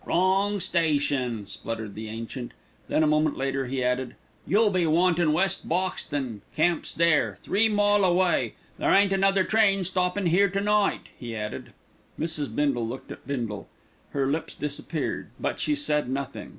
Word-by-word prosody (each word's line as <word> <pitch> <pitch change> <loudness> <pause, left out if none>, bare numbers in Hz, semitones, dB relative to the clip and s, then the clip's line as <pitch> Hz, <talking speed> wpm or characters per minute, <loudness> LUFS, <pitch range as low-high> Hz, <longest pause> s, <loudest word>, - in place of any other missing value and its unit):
"Wrong 195 +3 +2
station," 145 - 0
spluttered 110 -2 -6
the 110 0 -7
ancient. 115 +3 -6 0.3
Then 155 - +2
a - - +3
moment 155 0 +2
later 135 0 -1
he 130 0 -2
added, 125 0 -1 0.3
"You 210 +3 +4
be 180 -3 +1
wantin' 170 0 +3
West 180 +4 +1
Boxton. 145 - -2
Camp's 170 +1 +1
there. 170 -2 +2
Three 220 +3 +2
mile 205 -1 +3
away. 180 0 +2 0.2
There - - +1
ain't 195 0 +5
another 195 0 +3
train 195 -1 +3
stoppin' 180 +2 0
here 190 +4 +4
to 195 +2 -1
night," 210 0 +2 0.2
he 120 -3 -6
added. 105 -1 -5 0.5
Mrs. 160 -3 0
Bindle 135 -6 +1
looked 125 +3 -7
at - - -10
Bindle. 115 -7 -3 0.4
Her 140 -1 -1
lips 150 +4 -2
had - - -21
disappeared; 150 +2 -3
but - - -2
she 300 - +1
said 150 - 0
nothing. 135 0 -4
160 Hz, 160 wpm, -26 LUFS, 135-190 Hz, 0.5 s, ain't